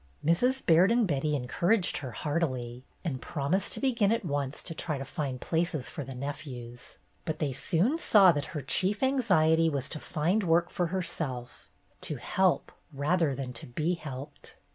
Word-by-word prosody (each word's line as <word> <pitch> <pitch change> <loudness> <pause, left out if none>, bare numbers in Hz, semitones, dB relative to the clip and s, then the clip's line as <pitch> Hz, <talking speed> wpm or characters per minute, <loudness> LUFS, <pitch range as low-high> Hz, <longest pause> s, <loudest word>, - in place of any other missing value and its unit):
Mrs. 250 - +2
Baird 175 +5 +5
and 235 -1 +3
Betty 150 -3 0
encouraged 170 - +1
her 130 - -5
heartily, 130 -4 -2 0.2
and 130 -6 -2
promised 170 +6 -1
to - - 0
begin 235 -7 +2
at 230 -4 0
once 145 -3 -2
to 165 - -5
try 155 -2 -2
to 135 - -5
find 135 -4 -4
places 160 -5 -1
for 145 - -5
the 135 0 -8
nephews, 125 -3 -7 0.3
but 155 -1 -3
they 150 -4 -1
soon 205 - +1
saw 200 - +6
that 145 -3 -2
her - - -2
chief 200 - +2
anxiety 170 -12 +3
was 140 -3 -2
to 155 - -5
find 170 +10 0
work 170 -1 +2
for 175 - 0
herself, 155 -9 -4 0.3
to 150 - -2
help 185 +8 +1 0.2
rather 150 +1 +1
than 130 -2 -5
to 115 - -7
be 155 +8 -1
helped. 145 -3 -8
155 Hz, 170 wpm, -29 LUFS, 135-180 Hz, 0.3 s, saw